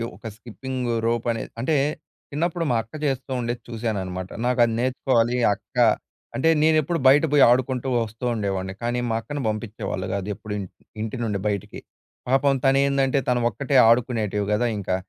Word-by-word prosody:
ఒక 115 - -9
skipping 125 +2 -5 0.2
rope 115 0 0
అనేది, 115 - -5
అంటే 150 +6 +1 0.6
చిన్నప్పుడు 165 +3 -1
మా - - +2
అక్క 115 - -28
చేస్తూ 135 -1 -2
ఉండేది 120 0 -3
చూశాననమాట. 95 -6 -3 0.2
నాకు 125 0 +1
అది 115 - -2
నేర్చుకోవాలి 125 -2 +1 0.2
అక్క - - -29 0.6
అంటే 160 +5 +2
నేనెప్పుడు 160 +1 +2
బయట 145 +4 +6
పోయి 145 -2 +6
ఆడుకుంటూ 125 +1 +1
వస్తూ 115 0 -3
ఉండేవాడిని 95 -3 -2
కానీ 120 +1 0
మా 110 - 0
అక్కని 145 +3 -5
పంపించేవాళ్ళు 105 -3 -3
కాదు 100 0 -3
ఎప్పుడు 105 0 -7
ఇన్ 95 - -4 0.4
ఇంటి 110 +3 -4
నుండి 105 -3 -1
బయటికి. 100 -3 -3 0.5
పాపం 135 +1 +3
తను 135 0 +4
ఏందంటే 140 0 +2
తను 125 -1 +2
ఒక్కటే 135 +6 -3
ఆడుకునేటివి 110 -4 +1
కదా 120 +3 +1
ఇంకా 95 -2 -1
120 Hz, 160 wpm, -24 LUFS, 110-135 Hz, 0.6 s, బయట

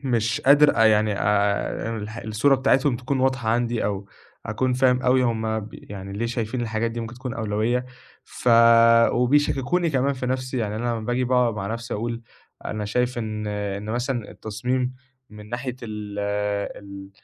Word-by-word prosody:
مش 115 -5 0
قادر 145 +2 +5
أ 115 - +5
يعني 110 -1 +4
آآ 105 +2 0
الح 110 +2 -7
الصورة 110 +6 +2
بتاعتهم 135 -1 +2
تكُون 130 +2 -2
واضحة 130 -3 0
عندي 120 0 0
أو 100 -1 -3 0.4
أكُون 125 +4 0
فاهم 125 0 +2
أوي 130 0 +3
هُم 110 -2 0
ب 105 - -9
يعني 100 -1 -9
ليه 115 +4 -2
شايفين 120 +1 -3
الحاجات 115 0 -1
دي 115 - -5
ممكن 115 +1 -6
تكُون 125 0 -6
أولويّة 110 +3 -1 0.4
ف - - -4 0.6
وبيشكّكوني 145 +6 +2
كمان 135 0 +1
في 130 -1 -4
نَفْسي، 130 0 -2
يعني 105 -2 -2
أنا 110 - -4
لما 115 - -2
باجي 120 +3 -1
باقعُد 125 -2 +2
مع 100 -2 -4
نَفْسي 115 +3 -4
أقول: 115 +2 -3 0.4
"أنا 105 -1 -3
شايف 125 +3 -1
إن 110 -1 -4
إن 105 -1 -3
مثلًا 120 -1 -2
التصميم 125 +4 -3 0.4
من 105 0 -12
ناحية 125 +1 -4
ال 105 -2 -6 0.6
ال 100 -1 -10
115 Hz, 165 wpm, -24 LUFS, 105-125 Hz, 0.6 s, قادر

